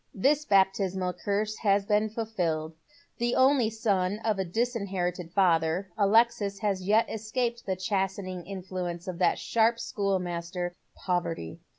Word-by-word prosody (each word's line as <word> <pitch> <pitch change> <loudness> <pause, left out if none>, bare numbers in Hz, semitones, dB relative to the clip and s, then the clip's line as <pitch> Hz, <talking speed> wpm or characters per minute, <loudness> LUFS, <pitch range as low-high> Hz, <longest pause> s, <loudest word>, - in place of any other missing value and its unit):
This 285 +9 +2
baptismal 190 -2 +2
curse 205 +4 -2
has 200 -2 +2
been 210 +1 +2
fulfilled. 175 -8 -2 0.5
The 240 +1 +1
only 260 -3 +4 0.2
eon 190 -1 +2
of 215 -3 +1
it 185 -3 -3
disinherited 190 -7 -2
father, 175 0 +2
Alexia 215 0 +3
has 195 -3 0
yet 210 +5 +3
escaped 235 +1 -3
the 190 - 0
chastening 185 -2 -2
influence 180 -2 -5
of 180 -2 -5
that - - +3
sharp 230 +1 +2
schoolmaster, 180 -5 -2 0.2
Poverty. 170 - -3
195 Hz, 125 wpm, -28 LUFS, 180-220 Hz, 0.5 s, only